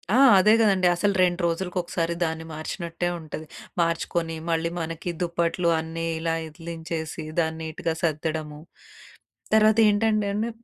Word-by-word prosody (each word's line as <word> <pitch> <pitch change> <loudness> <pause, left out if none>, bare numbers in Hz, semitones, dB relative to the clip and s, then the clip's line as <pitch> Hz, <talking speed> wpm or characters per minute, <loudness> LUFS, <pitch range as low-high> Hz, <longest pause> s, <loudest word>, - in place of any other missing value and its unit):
ఆ! - - +5 0.2
అదే 210 +3 +6
గదండీ 195 -5 +4
అసలు 200 +3 +1
2 180 0 +1
రోజులకొకసారి 170 -1 -1
దాన్ని 160 -1 -2
మార్చినట్టే 170 +2 -4
ఉంటది. 155 0 -7 0.4
మార్చుకొని 165 0 -1
మళ్ళీ 165 0 +1
మనకి 165 +1 -4
దుప్పట్లు 170 0 0
అన్నీ 165 +1 -4
ఇలా 165 0 -1
ఇదిలించేసి 165 0 -6 0.2
దాన్నీటుగా 160 0 -2
సద్దడము. 155 -1 -2 0.9
తర్వాతేంటంటేండి 215 0 +3
170 Hz, 105 wpm, -25 LUFS, 160-185 Hz, 0.9 s, అదే